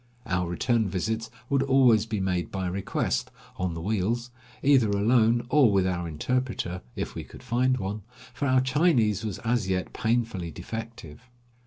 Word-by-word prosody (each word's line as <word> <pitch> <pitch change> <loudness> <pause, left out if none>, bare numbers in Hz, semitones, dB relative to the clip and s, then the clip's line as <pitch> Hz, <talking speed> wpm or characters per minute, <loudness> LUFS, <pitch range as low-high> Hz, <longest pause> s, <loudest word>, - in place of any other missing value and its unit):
Our 90 -2 -1
return 110 +4 +1
visits 110 +5 -2 0.2
would 140 0 +2
always 130 -5 +4
be 110 -2 -2
made 90 -4 -1
by 95 -1 -3
request, 90 -8 -1 0.3
on 90 -2 -2
the 80 - -5
wheels, 110 +5 -1 0.3
either 135 -6 +5
alone 115 +3 +3
or 135 -6 +5
with 95 -2 +3
our 90 -2 -1
interpreter, 95 +1 -2
if - - -4
we - - -5
could - - -14
find 125 +1 +1
one, 105 0 -4 0.3
for 140 - -2
our 130 -1 +4
Chinese 130 - +2
was 105 -5 -3
as 115 -4 +1
yet 90 -1 -1
painfully 115 -7 -1
defective. 115 - -8
110 Hz, 160 wpm, -27 LUFS, 95-125 Hz, 0.3 s, either